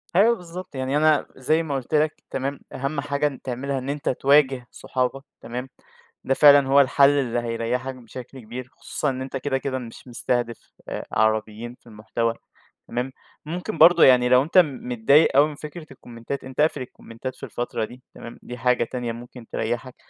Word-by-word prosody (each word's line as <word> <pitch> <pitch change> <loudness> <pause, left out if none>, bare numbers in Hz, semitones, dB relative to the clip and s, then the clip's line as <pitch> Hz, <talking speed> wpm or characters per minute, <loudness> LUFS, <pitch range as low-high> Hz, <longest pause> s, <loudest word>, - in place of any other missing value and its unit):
أيوه 220 +6 +5
بالضبط، 180 -3 -9
يعني 130 +2 -1
أنا 155 -1 +3
زي 155 +5 +1
ما 145 -3 -3
قلت 135 +2 -5
لَك 155 0 +3 0.2
تمام، 135 +1 -3
أهم 140 +2 -2
حاجة 140 -1 -1
تعملها 135 +2 -3
إن 130 +2 -6
أنت 145 0 -2
تواجه 135 -1 +3
صحابك 130 +1 -2 0.2
تمام، 125 +3 -6 0.5
ده 135 - +1
فعلًا 140 -1 +7
هو 140 +1 +6
الحل 140 +1 +5
اللي 130 -5 +1
هيريحك 120 +3 -2
بشكل 125 +2 -10
كبير، 120 +2 -8
خصوصًا 145 +5 -3
إن 130 -1 -3
أنت 135 +1 -4
كده 135 0 -1
كده 130 0 -3
مش 120 +1 -11
مستهدف 120 -1 -3 0.2
آآ، - - -5
عربيين 110 +2 0
في - - -24
المحتوى 115 +1 -2 0.5
تمام، 125 +2 -3 0.3
ممكن 180 +7 -4
برضو 170 0 +7
يعني 125 -1 +6
لو 125 +1 +6
أنت 165 +6 -1
متضايق 140 -3 +4
أوي 145 +2 +7
من 150 - -8
فكرة 155 +3 -9
الكومنتات 120 +1 -7
أنت 130 0 -10
اقفل 155 -2 +2
الكومنتات 125 0 -8
في - - -17
الفترة 120 -2 -3
دي 125 +3 -14
تمام، 115 - -10
دي 125 - -7
حاجة 125 +1 +2
تانية 120 0 -4
ممكن 120 0 -10
تريَّحك، 120 +3 -3
130 Hz, 175 wpm, -24 LUFS, 120-140 Hz, 0.5 s, فعلًا